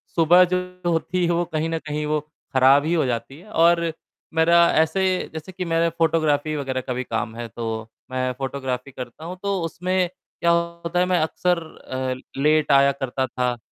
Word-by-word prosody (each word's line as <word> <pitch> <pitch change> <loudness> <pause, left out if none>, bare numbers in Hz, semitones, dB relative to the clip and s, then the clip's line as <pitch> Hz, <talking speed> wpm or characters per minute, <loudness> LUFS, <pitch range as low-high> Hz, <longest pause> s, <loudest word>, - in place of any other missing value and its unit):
सुबह 175 +2 +6
जो - - +4 0.3
होती 175 +2 0
है 170 - +1
वो 170 +1 +1
कहीं 155 +1 0
न 165 0 -1
कहीं 150 0 -2
वो 150 0 +1 0.3
ख़राब 135 +2 +5
ही 165 - +1
हो 165 -4 +2
जाती 125 +4 -3
है 200 - -16
और 170 -2 +3 0.4
मेरा 170 +1 +5
ऐसे 160 +4 +2 0.3
जैसे 160 +4 -7
कि 180 0 -5
मेरा 165 0 +2
फ़ोटोग्राफी 155 -2 +1
वग़ैरह 130 -3 -2
का 125 - -4
भी 125 +1 -2
काम 110 -1 -3
है 120 0 -5
तो 115 +1 -6 0.4
मैं 130 0 0
फ़ोटोग्राफी 135 -1 -4
करता 125 +4 -8
हूँ। 180 +2 -6
तो 200 -2 0
उसमें 180 +2 -1
क्या 170 -1 -2
होता 170 0 -1
है 180 - +4
मैं 180 -1 +2
अक्सर 175 +3 +1 0.2
अ, 130 0 -5
लेट 150 0 +3
आया 140 0 +6
करता 135 -1 -2
था। 125 0 -1
155 Hz, 190 wpm, -23 LUFS, 130-170 Hz, 0.4 s, सुबह